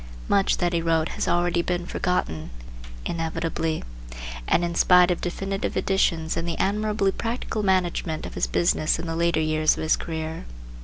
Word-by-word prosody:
Much 195 Hz, -1 st, +3 dB
that 175 Hz, -1 st, 0 dB
he 170 Hz, -, +1 dB
wrote 165 Hz, -1 st, +1 dB
has -, -, -3 dB
already 175 Hz, 0 st, +2 dB
been 175 Hz, 0 st, -2 dB
forgotten, 80 Hz, -, -2 dB, 0.6 s
inevitably, 165 Hz, -1 st, -2 dB, 0.6 s
and 175 Hz, -, +3 dB
in 170 Hz, -, -3 dB
spite 180 Hz, +1 st, +5 dB
of 175 Hz, -, -2 dB
definitive 195 Hz, +2 st, -3 dB
editions 165 Hz, -4 st, +1 dB
and 165 Hz, +1 st, -2 dB
the 165 Hz, -, -2 dB
admirably 210 Hz, 0 st, +1 dB
practical 230 Hz, 0 st, -3 dB
management 180 Hz, -4 st, 0 dB
of -, -, -7 dB
his -, -, 0 dB
business 155 Hz, -2 st, +2 dB
in 165 Hz, -, -5 dB
the 165 Hz, -1 st, -3 dB
later 170 Hz, -1 st, +2 dB
years 155 Hz, 0 st, +2 dB
of -, -, -3 dB
his 155 Hz, -, +3 dB
career. 160 Hz, -, -5 dB
170 Hz, 165 wpm, -25 LUFS, 160-185 Hz, 0.6 s, spite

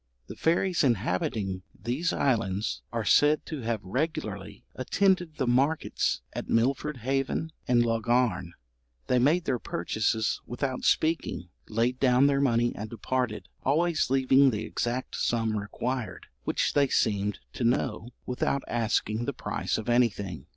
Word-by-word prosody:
The -, -, -9 dB
fairies 170 Hz, +1 st, +1 dB
inhabiting 95 Hz, -4 st, 0 dB, 0.2 s
these 140 Hz, +10 st, -1 dB
islands 100 Hz, -, 0 dB
are -, -, -2 dB
said 150 Hz, +1 st, +4 dB
to 155 Hz, -4 st, -5 dB
have 115 Hz, -2 st, -2 dB
regularly 110 Hz, -, -3 dB
attended 180 Hz, +4 st, +1 dB
the 135 Hz, -, -1 dB
markets 135 Hz, +6 st, +1 dB
at -, -, -5 dB
Milford 135 Hz, +5 st, +1 dB
Haven 135 Hz, +4 st, -1 dB, 0.2 s
and 120 Hz, -1 st, +4 dB
Laugharne. 115 Hz, -6 st, +1 dB, 0.5 s
They 125 Hz, -, +2 dB
made 155 Hz, +8 st, +3 dB
their 125 Hz, -3 st, 0 dB
purchases 110 Hz, +5 st, -1 dB
without 130 Hz, +1 st, -3 dB
speaking, 160 Hz, -, +1 dB, 0.2 s
laid 120 Hz, +4 st, 0 dB
down 130 Hz, 0 st, +4 dB
their 140 Hz, -1 st, +3 dB
money 120 Hz, -3 st, +2 dB
and 105 Hz, +1 st, -6 dB
departed, 120 Hz, -1 st, -2 dB
always 160 Hz, +3 st, +1 dB
leaving 135 Hz, +1 st, +5 dB
the 110 Hz, -3 st, -2 dB
exact 120 Hz, +2 st, -3 dB
sum 115 Hz, -2 st, 0 dB
required, 115 Hz, +4 st, -4 dB, 0.2 s
which -, -, 0 dB
they 140 Hz, -1 st, +4 dB
seemed 105 Hz, -4 st, +1 dB, 0.2 s
to -, -, -4 dB
know, 120 Hz, -1 st, 0 dB, 0.2 s
without 130 Hz, +2 st, -1 dB
asking 115 Hz, -1 st, 0 dB
the 140 Hz, -, -2 dB
price 125 Hz, -, -2 dB
of 110 Hz, -, -6 dB
anything. 110 Hz, -8 st, 0 dB
125 Hz, 135 wpm, -28 LUFS, 110-140 Hz, 0.5 s, leaving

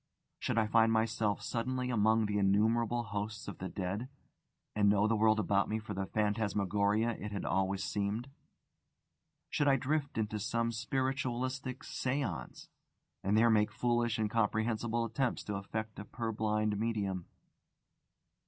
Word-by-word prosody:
Should -, -, -1 dB
I 110 Hz, -, +4 dB
find 115 Hz, +1 st, +4 dB
myself 110 Hz, -2 st, +1 dB
suddenly 125 Hz, +2 st, -2 dB
among 110 Hz, 0 st, +3 dB
the 105 Hz, 0 st, 0 dB
innumerable 115 Hz, +4 st, +2 dB
hosts 105 Hz, -1 st, -4 dB
of -, -, -7 dB
the 95 Hz, -, -4 dB
dead, 100 Hz, +7 st, -3 dB, 0.7 s
and 100 Hz, -1 st, +4 dB
know 100 Hz, +1 st, +4 dB
the 115 Hz, -, +2 dB
world 110 Hz, 0 st, +4 dB
about 100 Hz, -1 st, +2 dB
me 110 Hz, -, 0 dB
for 110 Hz, -1 st, -6 dB
the 95 Hz, 0 st, -3 dB
phantasmagoria 105 Hz, +1 st, +1 dB
it 105 Hz, -, -5 dB
had 100 Hz, -2 st, -4 dB
always 95 Hz, +1 st, 0 dB
seemed? 105 Hz, +4 st, -2 dB, 1.2 s
Should 145 Hz, -, +1 dB
I 135 Hz, -, +6 dB
drift 140 Hz, +2 st, -1 dB
to 105 Hz, -1 st, -1 dB
some 115 Hz, +3 st, 0 dB
spiritualistic 130 Hz, +1 st, -2 dB
séance, 135 Hz, 0 st, -3 dB, 0.6 s
and 100 Hz, +3 st, +2 dB
there 115 Hz, +1 st, +5 dB
make 105 Hz, -1 st, +3 dB
foolish, 120 Hz, -1 st, +1 dB
incomprehensible 110 Hz, +2 st, 0 dB
attempts 120 Hz, +3 st, -1 dB
to 105 Hz, -, -4 dB
affect 110 Hz, +2 st, -5 dB
a -, -, -5 dB
purblind 110 Hz, -2 st, -1 dB
medium? 100 Hz, -5 st, -1 dB
110 Hz, 140 wpm, -33 LUFS, 105-120 Hz, 1.2 s, I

